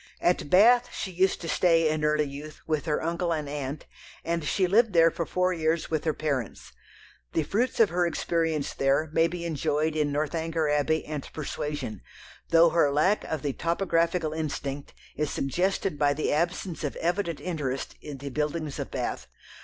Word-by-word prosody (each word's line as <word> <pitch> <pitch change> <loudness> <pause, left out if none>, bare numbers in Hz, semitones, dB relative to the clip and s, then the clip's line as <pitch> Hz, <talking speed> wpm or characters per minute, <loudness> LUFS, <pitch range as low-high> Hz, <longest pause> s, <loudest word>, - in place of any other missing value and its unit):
At 175 -4 +1
Bath 240 +7 +6
she 190 - -4
used 185 +2 +1
to 170 - -5
stay 165 -2 +3
in 155 0 0
early 150 0 +3
youth 145 +2 -8
with 155 -2 -1
her 155 -2 0
uncle 170 +1 -1
and 155 -3 -1
aunt, 140 0 -5 0.4
and 170 -1 -1
she 185 +5 +1
lived 215 +3 +3
there 165 -1 +6
for 170 - -3
four 180 0 +1
years 160 -1 -1
with 155 -1 -1
her 155 - +2
parents. 140 -7 -3 0.6
The 160 - +1
fruits 230 - -1
of 225 -3 +6
her 175 0 +1
experience 165 -2 -1
there 140 +3 +1
may 165 +1 +4
be 170 0 -5
enjoyed 155 -1 0
in 150 -2 +1
Northanger 160 +2 -1
Abbey 150 +2 +1
and 150 -2 -6
Persuasion, 145 - -4 0.5
though 165 0 +6
her 160 -4 +3
lack 170 +9 +2
of 155 -4 -4
the 140 -2 -1
topographical 170 -1 0
instinct 145 -3 -4 0.2
is 150 -1 -1
suggested 180 +3 -1
by 145 -1 +3
the 155 - 0
absence 170 +2 -1
of 145 - -2
evident 170 -1 -1
interest 145 -7 -3
in 145 -2 -7
the 140 +1 -6
buildings 150 +1 -2
of - - -4
Bath. - - -3
160 Hz, 175 wpm, -27 LUFS, 150-170 Hz, 0.6 s, Bath